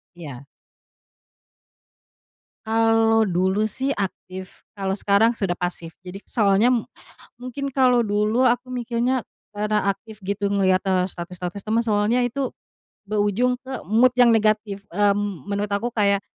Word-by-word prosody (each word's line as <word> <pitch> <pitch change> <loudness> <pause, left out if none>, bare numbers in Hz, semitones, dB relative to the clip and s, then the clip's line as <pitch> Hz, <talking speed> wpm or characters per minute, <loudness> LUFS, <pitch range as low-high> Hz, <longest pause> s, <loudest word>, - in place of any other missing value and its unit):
Iya. 145 -6 -9 2.2
Kalau 225 0 +3
dulu 190 +2 +1
sih 260 +6 -2
aktif, 185 -1 -6 0.2
kalau 195 -1 -2
sekarang 205 +3 +3
sudah 195 -6 -2
pasif. 175 -2 -5
Jadi 185 +2 -8
soalnya, 210 0 +3 0.7
mungkin 270 +2 -5
kalau 250 -2 +3
dulu 210 +4 +1
aku 245 +1 +1
mikirnya 245 0 -1 0.3
karena 210 -1 0
aktif 215 +2 -4
gitu 200 +1 -2
ngelihat, 190 -1 +2
eee, 185 -1 +1
status-status 180 +2 -7
temen, 220 +2 +1
soalnya 220 +1 +1
itu 255 +2 -1 0.5
berujung 215 +5 0
ke 260 -1 -7
mood 235 +6 +4
yang 245 -2 +6
negatif, 215 -2 +1
mmm, 200 -3 0
menurut 205 0 -2
aku 205 +4 -1
kayak, 200 -3 +2
210 Hz, 125 wpm, -23 LUFS, 195-235 Hz, 2.2 s, yang